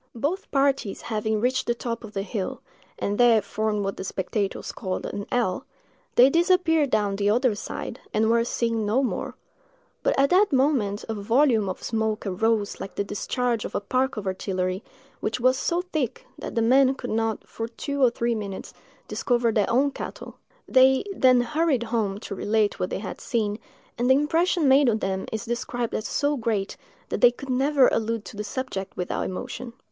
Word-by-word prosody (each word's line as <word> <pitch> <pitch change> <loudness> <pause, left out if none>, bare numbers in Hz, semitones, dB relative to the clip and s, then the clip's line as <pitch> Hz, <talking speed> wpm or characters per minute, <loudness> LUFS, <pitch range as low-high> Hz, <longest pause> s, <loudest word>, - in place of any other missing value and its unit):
Both 315 - -2
parties 275 -7 +1
having 220 -1 -1
reached 255 +3 0
the 235 - +1
top 235 -1 -4
of 220 -2 -10
the 195 - -2
hill, 200 -2 -4 0.4
and 205 +2 -2
there 240 -2 +6
formed 210 +1 -2
what 195 - -3
the - - -5
spectators 195 +1 -3
called 185 -1 -4
an 200 - -5
L, 240 -1 0 0.5
they 250 - +8
disappeared 330 -1 +3
down 205 -4 +1
the 205 0 +1
other 240 +2 +3
side, 205 - -6
and 220 +1 +2
were 230 +1 +3
seen 230 -1 -1
no 220 +6 +2
more; 255 - -3 0.7
but - - +1
at 275 0 +3
that 385 +3 +4
moment 255 -7 +1
a 225 - -2
volume 225 0 +2
of 185 - -6
smoke 220 -1 -1
arose 210 +2 0
like 195 - -7
the - - 0
discharge 230 +3 -1
of - - -6
a - - +2
park 255 +5 0
of 210 - -4
artillery, 185 0 -2 0.4
which 220 +3 -2
was 255 +1 +4
so 345 +6 0
thick 305 -9 -3
that - - -6
the 230 - +2
men 265 +3 +5
could - - -6
not, 225 0 -1
for 225 - -5
two 280 +4 -4
or 250 - +7
three 235 0 -1
minutes, 200 -3 -5 0.3
discover 240 -2 +1
their 210 -2 +1
own 275 +4 +3
cattle. - - -7 0.3
They 260 0 +5
then 255 -4 +5
hurried 280 0 +1
home 220 -4 -1
to - - -6
relate 210 +1 0
what 180 - -1
they - - -2
had 190 -1 -7
seen, 215 -3 -1 0.4
and 245 +1 +2
the 260 - +7
impression 325 +3 +2
made 270 0 +6
on 220 - +2
them 190 -2 -2
is 220 +1 -3
described 240 0 -3
as 215 - -2
so 290 0 0
great, 220 -4 -1 0.3
that - - -3
they 245 - +9
could 265 +3 -10
never 270 +1 +4
allude 225 -1 -1
to - - -9
the 210 - -4
subject 205 -3 -5
without 180 - -2
emotion. 230 +6 -6
230 Hz, 190 wpm, -25 LUFS, 210-260 Hz, 0.7 s, they